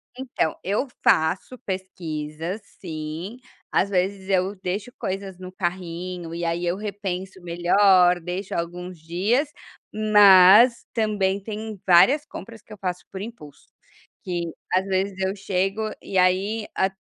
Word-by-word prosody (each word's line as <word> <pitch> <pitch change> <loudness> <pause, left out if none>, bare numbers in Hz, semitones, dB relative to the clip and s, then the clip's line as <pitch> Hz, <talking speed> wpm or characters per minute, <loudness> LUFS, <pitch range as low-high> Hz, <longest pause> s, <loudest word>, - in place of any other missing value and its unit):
Então, 250 - -2
eu 205 +9 0 0.2
faço 175 +10 +2
pesquisas 170 -1 -5 0.2
sim, 165 +5 -6 0.3
às 200 - +2
vezes 190 +1 -1
eu 190 +1 +1
deixo 200 +6 -3
coisas 190 -1 -4
no 185 0 -8
carrinho 175 -1 -4
,e 170 0 -4
aí 170 +1 -1
eu 175 +1 0
repenso 190 -3 -5
melhor, 180 +1 +4
deixo 180 +3 -5
alguns 175 +1 -5
dias, 200 - 0 0.4
mas 210 +2 +7
também 205 -4 0
tem 215 -1 -6
várias 265 - +6
compras 225 -2 -10
que - - -22
eu - - -11
faço 180 -2 -4
por 190 - -6
impulso, 190 -11 -10 0.6
que 175 -2 -2 0.3
às 185 +1 +2
vezes 190 0 -1
eu 190 +1 -1
chego 195 +1 -1 0.2
e 190 - -4
aí 195 +4 +2
a 190 0 +2
190 Hz, 135 wpm, -24 LUFS, 175-205 Hz, 0.6 s, mas